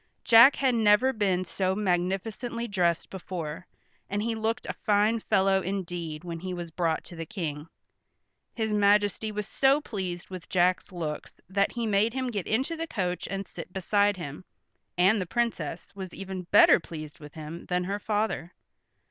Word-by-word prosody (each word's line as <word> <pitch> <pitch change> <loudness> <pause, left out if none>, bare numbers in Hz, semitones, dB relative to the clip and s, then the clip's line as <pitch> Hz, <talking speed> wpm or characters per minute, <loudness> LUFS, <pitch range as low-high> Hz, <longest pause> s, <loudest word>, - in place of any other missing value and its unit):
Jack 235 +4 +8
had 265 -2 +2
never 225 +3 +4
been 190 -5 +1
so 190 +1 -1
magnificently 210 +5 -1
dressed 175 -5 0
before, 175 -3 -6 0.4
and 205 +1 -1
he 230 0 0
looked 225 +2 -2
a - - -3
fine 215 +1 +2
fellow 195 -2 +2
indeed 175 -5 -4
when 170 -2 -5
he 185 +1 -4
was 170 -1 -6
brought 165 -1 0
to 175 - -11
the 165 - -4
King. 150 -4 -4 0.9
His 220 -2 -1
majesty 205 +1 +3
was 210 -1 -4
so 270 +4 +3
pleased 190 -10 -5
with 185 -2 -8
Jack's 180 +1 +2
looks 160 -4 -5
that 200 +1 +1
he 235 -1 -2
made 215 +3 +2
him 260 -2 -1
get 205 -5 -3
into 265 +9 0
the 330 +1 -4
coach 180 - -2
and 195 0 -4
sit - - -9
beside 200 +2 +2
him, 145 -1 -7 0.5
and 190 +4 +4
the 180 - -4
Princess 235 +4 -2
was 190 -2 -7
even 190 -2 -6
better - - +7
pleased 155 -3 -9
with 150 -2 -12
him 155 +2 -8
than 180 0 0
her 200 +3 -2
father. 210 -5 -2
195 Hz, 170 wpm, -28 LUFS, 175-220 Hz, 0.9 s, Jack